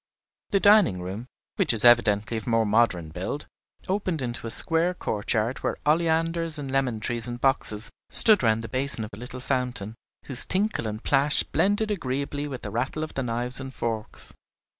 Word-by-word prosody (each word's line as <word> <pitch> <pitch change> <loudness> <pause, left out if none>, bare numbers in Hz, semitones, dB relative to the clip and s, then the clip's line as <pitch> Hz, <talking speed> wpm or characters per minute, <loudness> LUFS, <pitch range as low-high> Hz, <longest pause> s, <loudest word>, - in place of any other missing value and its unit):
The 200 - +2
dining 200 - +4
room, 100 +7 -6 0.3
which 185 - +2
was 115 +1 +8
evidently 115 -2 +4
of 110 - -7
more 115 -1 +2
modern 105 -7 +1
build, 90 - -5 0.4
opened 185 -4 -1
into 120 -1 -5
a - - -4
square 165 +8 +1
courtyard 110 - -2
where - - -2
oleanders 165 +1 +1
and 140 -2 -6
lemon 130 -4 0
trees 120 +2 -2
in 120 0 -4
boxes 125 -3 +1 0.2
stood 215 -3 +6
round 115 -1 +1
the - - -5
basin 130 -2 -1
of 105 - -8
a - - -9
little 125 +1 -8
fountain, 125 -5 -3 0.3
whose 130 -3 0
tinkle 195 - -1
and 110 +1 -6
plash 140 +1 +4
blended 205 +2 0
agreeably 145 -4 -3
with 135 -3 -7
the 105 - -6
rattle 130 +7 -2
of 155 - -6
the 135 - -2
knives 125 +1 -3
and 130 0 -8
forks. 110 -2 -4
125 Hz, 180 wpm, -25 LUFS, 115-155 Hz, 0.4 s, was